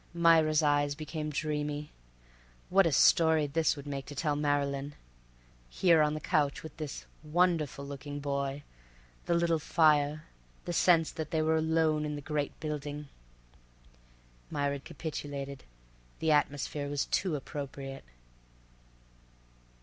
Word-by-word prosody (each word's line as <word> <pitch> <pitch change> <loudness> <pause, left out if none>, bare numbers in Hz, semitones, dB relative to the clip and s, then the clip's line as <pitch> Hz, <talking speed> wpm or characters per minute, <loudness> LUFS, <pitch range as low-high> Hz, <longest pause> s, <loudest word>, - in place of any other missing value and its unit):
Myra's 160 -2 +4
eyes 145 -1 +2
became 155 0 -5
dreamy. 150 0 -3 0.8
What 195 -1 +5
a - - +1
story 160 +2 +5
this 155 +2 +1
would 140 -1 -9
make 140 -1 -5
to 145 - -8
tell 150 +1 0
Marylyn! 145 -1 -1 0.7
Here 165 - +4
on 150 0 +2
the - - -3
couch 145 -2 0
with 160 - -9
this 155 -3 -6 0.2
wonderful 155 -3 +1
looking 145 +1 -6
boy—the 140 0 -2 0.7
little 170 -1 +2
fire—the 150 - 0
sense 165 -2 +4
that 160 -2 -5
they 160 -1 0
were 160 +1 +2
alone 160 -1 +2
in 150 -1 -3
the 145 - -6
great 145 0 -3
building— 150 -1 -5 1.4
Myra 140 0 -1
capitulated. 145 -3 -6 0.5
The 160 - +1
atmosphere 145 -1 0
was 145 -1 -1
too 185 -5 0
appropriate. 135 -1 -6
150 Hz, 120 wpm, -30 LUFS, 145-160 Hz, 1.4 s, What